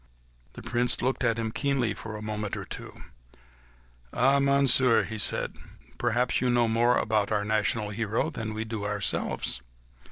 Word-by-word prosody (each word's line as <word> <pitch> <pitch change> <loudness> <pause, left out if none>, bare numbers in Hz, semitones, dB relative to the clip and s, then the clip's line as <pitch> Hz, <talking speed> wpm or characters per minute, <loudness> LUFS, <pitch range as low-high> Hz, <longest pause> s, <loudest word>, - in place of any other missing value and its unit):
The - - -10
Prince 120 0 0
looked 130 +1 0
at 115 -2 +2
him 115 -1 -2
keenly 135 -4 0
for 110 +1 -8
a 105 - -8
moment 105 -1 -3
or - - -6
two. - - -7
"Faith, - - -14 1.1
then, 140 +2 +3
Monsieur," 135 -3 +4
he 110 0 -5
said, - - -1 0.4
"perhaps 120 +1 +1
you 125 - +2
know 120 -1 +3
more 120 +2 +3
about 110 -1 +1
our 105 -1 +1
national 105 0 0
hero 110 +8 -1
than 110 -6 -5
we 110 +1 -3
do 110 -2 -4
ourselves 105 -10 -1
115 Hz, 165 wpm, -27 LUFS, 110-125 Hz, 1.1 s, Monsieur